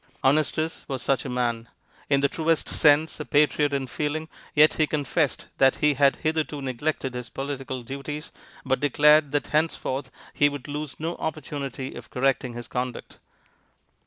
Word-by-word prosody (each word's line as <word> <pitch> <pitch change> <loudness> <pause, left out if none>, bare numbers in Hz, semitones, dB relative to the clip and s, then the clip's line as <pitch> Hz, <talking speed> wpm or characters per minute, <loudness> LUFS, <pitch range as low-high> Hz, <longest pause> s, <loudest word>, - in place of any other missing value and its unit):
Honestus 155 +3 +1
was 135 -3 -4
such 135 -4 +1
a - - -3
man: 120 -2 -1 0.4
in 140 -1 +3
the 140 - +4
truest 165 +1 0
sense 155 +1 +3
a - - -2
patriot 145 +1 +3
in 140 -1 -1
feeling, 155 +4 -3 0.3
yet 155 +1 +6
he 155 - +2
confessed 150 0 0
that 135 -1 +5
he 150 0 +3
had 140 0 +4
hitherto 155 -2 -1
neglected 135 0 -2
his 125 -2 -6
political 135 -1 -5
duties, 140 +4 -6 0.3
but 130 0 +1
declared 150 +1 +5
that 145 0 0
henceforth 145 -4 -1 0.2
he 145 - +4
would 145 -3 -7
lose 145 0 -5
no 165 +2 -2
opportunity 140 -4 -4
of - - -10
correcting 130 -1 0
his 120 0 -7
conduct. 125 -1 -5
145 Hz, 160 wpm, -25 LUFS, 130-150 Hz, 0.4 s, yet